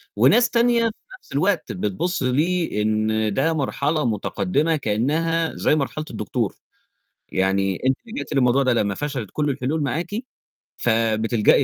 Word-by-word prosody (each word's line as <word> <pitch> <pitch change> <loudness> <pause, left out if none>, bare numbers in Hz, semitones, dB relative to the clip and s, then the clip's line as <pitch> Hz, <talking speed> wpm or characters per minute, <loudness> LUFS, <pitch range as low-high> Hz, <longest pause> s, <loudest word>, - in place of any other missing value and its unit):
وناس 240 -1 +5
تانية 235 0 +3
في 230 - +2 0.3
نفس - - -24
الوقت 170 +6 0
بتبُص 105 - -2
ليه 155 -2 +1
إن 110 0 +1
ده 160 +5 +1
مرحلة 150 0 0
متقدمة 115 - 0
كأنها 155 +7 0
زي - - +2
مرحلة 155 +1 -2
الدكتور. - - -2 0.8
يعني 95 0 +1
أنتِ 130 - +3
لجأتِ 230 - -6
للموضوع 130 0 +3
ده 130 - +2
لمّا 105 -4 +1
فشلت 135 -5 -4
كُل 150 -1 0
الحلول 140 +4 -1
معاكِ، 150 +7 -2 0.7
فبتلجأي 110 -1 +2
135 Hz, 135 wpm, -22 LUFS, 110-160 Hz, 0.8 s, وناس